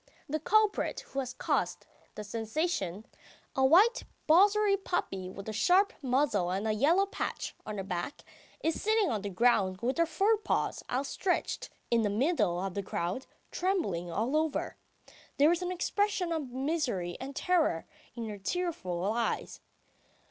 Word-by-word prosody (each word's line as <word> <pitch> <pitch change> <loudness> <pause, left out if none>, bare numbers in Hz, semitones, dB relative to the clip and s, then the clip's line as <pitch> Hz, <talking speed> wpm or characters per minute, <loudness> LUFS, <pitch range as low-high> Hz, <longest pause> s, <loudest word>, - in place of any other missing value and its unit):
The 310 +2 -1
culprit 430 +6 +2
who 275 - -3
has 255 -2 -3
caused - - -1 0.3
the 210 - -5
sensation, 220 - -2 0.5
a 265 - +2
white 375 - +5 0.2
borzoy 395 +4 +5
puppy 195 - -2
with 195 +2 -9
a 220 - -3
sharp 370 - +4
muzzle 255 -9 +1
and 195 +4 -1
a - - +2
yellow 325 - +3
patch 400 - -4
on 215 -1 -4
her 195 - -3
back, 185 +7 -4 0.4
is 325 - 0
sitting 435 -3 +2
on 215 -3 -1
the 205 - -4
ground 190 -2 +2
with 255 +7 -1
her 335 - +4
fore 395 +8 +2
paws 420 - -1
outstretched 280 +8 -1 0.2
in 235 -1 +4
the 210 - +1
middle 210 - +1
of 190 0 -3
the 200 - -2
crowd, 185 +6 -3 0.2
trembling 330 - -1
all 225 - -1
over. 315 -1 0 0.6
There 295 +3 +6
is 345 +1 0
an 360 0 -2
expression 370 0 0
of 310 -5 -2
misery 255 - -1
and 270 +2 -7
terror 325 - +1 0.3
in 230 -2 -4
her 210 -2 -6
tearful 195 - -2
eyes. 235 0 -2
270 Hz, 155 wpm, -30 LUFS, -, 0.6 s, There